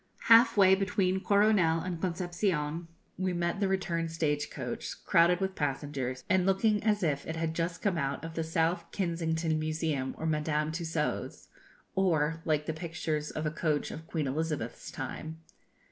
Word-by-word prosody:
Half 230 0 +6
way 190 -1 +7
between 190 -1 +1
Coronel 200 -6 +4
and 175 -2 -4
Concepcion, 175 -3 -1 0.3
we 185 -1 0
met 175 +2 -1
the 200 - +2
return 175 -4 -1
stage 150 -3 -1
coach, - - -6
crowded 170 +1 +4
with 190 0 -1
passengers, 135 -4 -3
and 190 -1 +3
looking 205 +3 +2
as 210 -2 +2
if 145 -4 0
it 160 - -3
had 160 0 -1
just 170 +1 -3
come 190 -5 +1
out 140 +2 -2
of 165 - -6
the 165 - -2
South 165 +1 0
Kensington 165 -3 -1
Museum 155 -4 -1
or 160 - -4
Madame 150 -1 0
Tussaud's, 160 -2 -3 0.4
or 165 -4 +1
like 150 -2 +1
the 160 - -2
pictures 160 -2 -3
of 155 - -4
a 155 - 0
coach 155 -2 -1
of 160 +1 -8
Queen 160 -3 -2
Elizabeth's 150 +3 -3
time. 160 +1 -6
165 Hz, 160 wpm, -30 LUFS, 155-185 Hz, 0.4 s, way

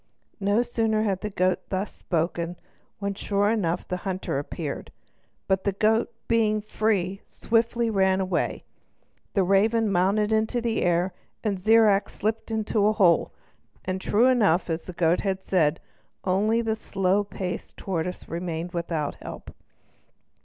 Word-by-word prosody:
No 205 +4 +2
sooner 225 -3 0
had 195 -3 -1
the 210 - -3
goat 185 -2 +1
thus 190 +2 -2
spoken, 170 0 -2 0.4
when 200 -1 -2
sure 205 +1 +1
enough 180 -6 -1
the 180 - -2
hunter 185 -6 -3
appeared; 145 0 -5 0.6
but 190 0 +1
the 200 - 0
goat, 220 +4 +2 0.2
being 220 -2 +2
free, 205 -3 -1
swiftly 235 +1 +1
ran 190 -2 +3
away; 185 -2 -1 0.7
the 195 - +4
raven 210 +3 +3
mounted 200 +4 +2
into 220 +3 +1
the 230 -1 -1
air, 175 +1 +1 0.3
and 205 -4 -1
Zirac 215 0 +4
slipped 220 +3 -3
into 215 -1 +1
a 215 - +3
hole, 180 -6 +3 0.5
and 185 0 -2
true 220 +5 +3
enough, 205 -10 +3
as 160 +1 -1
the 180 - -9
goat 170 0 +2
had 190 -1 -2
said, 165 -4 +2 0.4
only 210 +5 +2
the 220 -1 0
slow 195 -2 0
paced 185 -2 -6
tortoise 180 -1 -3
remained 170 0 -4
without 165 -4 -2
help. - - -9
195 Hz, 145 wpm, -26 LUFS, 180-215 Hz, 0.7 s, the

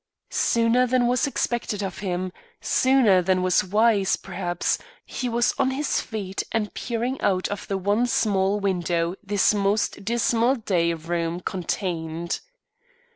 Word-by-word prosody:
Sooner 235 +2 +2
than 250 0 +2
was 245 +3 +2
expected 235 -6 -2
of 190 -2 -5
him, 185 -1 -3 0.3
sooner 255 -8 +4
than 185 0 +1
was 185 -1 +3
wise, 205 0 +3
perhaps, 175 -2 -2 0.3
he 250 - -3
was 235 +1 +2
on 270 -1 +3
his 275 +2 0
feet 200 -4 -4
and 215 -2 -1
peering 245 +2 -3
out 185 -2 +1
of 205 - -5
the 195 - -1
one 205 +6 +1
small 200 -3 +1
window 175 -3 0
this 205 0 +2
most 205 0 0
dismal 235 +3 +2
day 175 -8 0
room 165 +1 -2
contained. 170 -2 -3
200 Hz, 135 wpm, -24 LUFS, 180-235 Hz, 0.3 s, sooner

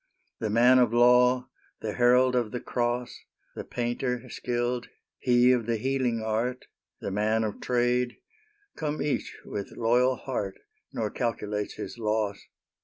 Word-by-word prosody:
The 110 - -2
man 120 +4 +5
of 120 -3 +4
law 125 +1 +5 0.3
the 105 -1 -3
herald 125 +1 +4
of 120 -3 +1
the 125 - -4
cross 120 0 -2 0.3
The - - -6
painter, 125 +1 -2
skilled 120 0 -2 0.3
he 125 0 +4
of 120 -3 +1
the 115 -1 +1
healing 125 -2 0
art 115 +4 -1 0.4
The - - -3
man 110 +3 +1
of 105 -2 -4
trade 125 0 +1 0.6
come 150 -1 -3
each 145 - -2
with 100 -1 -6
loyal 125 +3 +3
heart, 105 -8 -4 0.3
Nor 110 -2 -2
calculates 105 -3 -2
his 125 - -7
loss. 105 -2 -1
120 Hz, 140 wpm, -27 LUFS, 110-125 Hz, 0.6 s, man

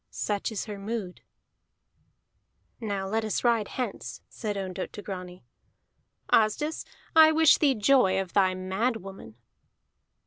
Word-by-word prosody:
Such 205 +1 -3
is 210 - -4
her 210 -3 -7
mood." 200 -3 -5 1.6
"Now 200 -4 -3
let 220 +3 -1
us 215 - -2
ride 230 -4 +2
hence," 255 - -5
said 210 -3 -5
Ondott 185 -1 -5
to 205 - -8
Grani. 180 -3 -8 0.9
"Asdis, 230 +9 +1 0.3
I 315 -1 +8
wish 320 -1 +5
thee 280 -4 +3
joy 210 -4 +3
of 190 -2 -5
thy 190 -2 +3
mad 190 +6 -1
woman." 190 - -10
205 Hz, 130 wpm, -27 LUFS, 190-235 Hz, 1.6 s, I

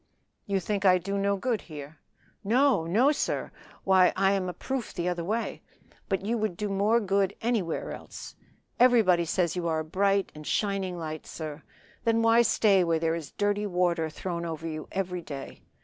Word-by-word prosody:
"You 200 -1 +1
think 200 +2 -2
I 185 -2 +6
do 195 +3 -4
no 200 0 +1
good 230 +1 -1
here?" 150 -1 -10 0.4
"No! 235 -5 +3
no! 235 - +4
sir. 300 - -2 0.3
Why 185 -1 +5
I 195 0 +3
am 190 -2 0
a - - -4
proof 265 +3 -4
the 175 -1 -2
other 175 -1 -1
way. 220 +6 -2 0.5
But 195 -1 -1
you 230 +2 0
would 215 -5 -2
do 210 -1 -2
more 205 +4 +2
good 195 -2 +1
anywhere 220 -8 -1
else. - - -9 0.4
Everybody 220 -9 +5
says 170 +1 0
you 175 -2 -2
are 160 -1 0
a - - -7
bright 195 +3 +1
and 155 - -10
a - - -10
shining 195 -3 -1
light, 155 -2 -6
sir. 155 -1 -7 0.4
Then 230 0 +2
why 230 +1 +6
stay 210 -4 +4
where 165 -1 +1
there 160 0 0
is 160 -5 -6
dirty 205 0 0
water 175 -3 +1
thrown 170 +2 -4
over 165 -1 -4
you 155 -1 -5
every 180 -2 -2
day? 140 -4 -8
190 Hz, 190 wpm, -28 LUFS, 170-210 Hz, 0.5 s, I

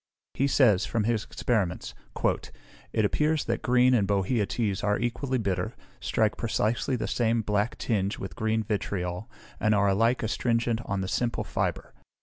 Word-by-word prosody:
He 140 - +1
says, 110 -9 +4
from 110 0 0
his 115 -1 0
experiments, 105 -8 -1 1.0
"it 110 - +2
appears 150 +7 +1
that 115 0 -1
green 125 +1 +4
and 105 -5 +3
bohea 100 +2 +1
teas 105 -4 -1
are 105 0 +2
equally 125 +3 -1
bitter, 95 -5 -2 0.2
strike 110 -2 +1
precisely 115 +2 0
the 120 - -2
same 115 -1 +1
black 105 +2 0
tinge 100 -3 -1
with 90 -4 -7
green 110 +2 0
vitriol, 95 -2 -3 0.3
and 110 0 +3
are 100 0 +3
alike 115 +6 +2
astringent 115 +1 0
on 100 -2 -2
the 95 - -3
simple 120 +4 -1
fibre. - - -3
110 Hz, 155 wpm, -27 LUFS, 100-120 Hz, 1.0 s, says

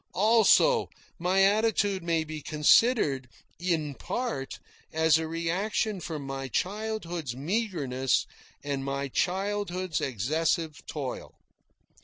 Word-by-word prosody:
Also, 230 - +4 0.3
my 185 +3 +3
attitude 205 -1 +2
may 165 -1 0
be 155 -1 -7
considered, 150 - +3 0.3
in 165 -5 -1
part, 225 - -4 0.3
as 160 0 +4
a 160 - -3
reaction 185 +5 -1
from 155 -4 -5
my 135 0 -4
childhood's 175 - -3
meagreness 145 - 0 0.4
and 140 -2 -2
my 140 0 -2
childhood's 185 0 -1
excessive 150 - -1
toil. 140 -4 -5
165 Hz, 100 wpm, -28 LUFS, 145-200 Hz, 0.4 s, Also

